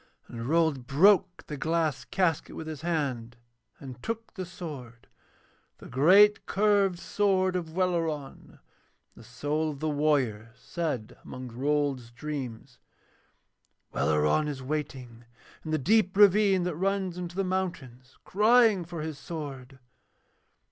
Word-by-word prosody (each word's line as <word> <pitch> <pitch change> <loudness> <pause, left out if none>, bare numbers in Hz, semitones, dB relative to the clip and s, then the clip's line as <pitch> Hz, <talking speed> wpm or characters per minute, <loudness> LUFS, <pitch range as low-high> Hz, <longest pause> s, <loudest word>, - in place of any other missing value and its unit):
And 115 0 -7
Rold 160 -6 +1
broke 180 +4 +3
the 150 - -6
glass 160 -3 -1
casket 180 -5 -1
with 160 - -6
his 155 -3 -7
hand 135 -9 -2 0.4
and 130 -3 -10
took 230 0 -5
the 185 -3 -6
sword, 135 -10 -9 0.7
the - - -14
great 190 +11 +5
curved 200 -3 +2
sword 190 0 +1
of 165 -3 -4
Welleran; 165 -6 -1
and - - -19 0.5
the - - -15
soul 145 +7 -2
of 145 -2 -7
the 155 - -2
warrior 135 -8 0
said 150 -9 -4
among 130 -1 -8
Rold's 135 0 -1
dreams: 125 -2 -7 1.1
'Welleran 75 - +2
is 140 -3 -5
waiting 130 -5 -5 0.4
in 160 - -7
the 155 - +1
deep 190 - +2
ravine 200 -2 +5
that 180 -3 -2
runs 190 0 -1
into 175 -1 -6
the 195 - 0
mountains, 170 -10 -4
crying 215 -1 +4
for 170 -1 -7
his 155 -3 -6
sword.' 135 -5 -7
155 Hz, 130 wpm, -28 LUFS, 130-185 Hz, 1.1 s, great